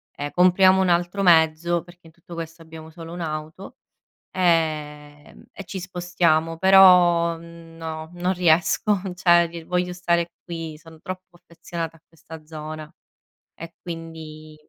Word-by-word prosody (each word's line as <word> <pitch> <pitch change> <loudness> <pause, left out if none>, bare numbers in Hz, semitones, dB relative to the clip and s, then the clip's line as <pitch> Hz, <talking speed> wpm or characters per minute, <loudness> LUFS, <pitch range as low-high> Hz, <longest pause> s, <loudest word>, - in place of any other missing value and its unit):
ehm, 145 0 -5
compriamo 185 +1 +5
1 185 - +1
altro 175 +3 0
mezzo", 165 0 +3
perché 175 -1 -18
in - - -17
tutto 170 +1 -14
questo 165 0 -8
abbiamo 160 -1 -12
solo 165 +1 -10
1 175 - -6
auto, 155 +3 -6 0.5
ehm, 150 -4 -2
"E 195 - -9
ci 190 +2 -7
spostiamo". 175 -3 0
Però 180 -3 +6
no, 165 -1 -9
non 180 +1 -1
riesco 180 +3 +2
cioè 170 -2 +2
voglio 180 +1 -1
stare 170 -1 0
qui, 165 -3 -7
son 160 0 -16
troppo 185 -2 -9
affezionata 170 -1 -7
a - - -40
questa 160 -1 -13
zona. 155 0 -8 0.7
E 165 +1 -9
quindi 160 -2 -9
170 Hz, 135 wpm, -23 LUFS, 160-180 Hz, 0.7 s, Però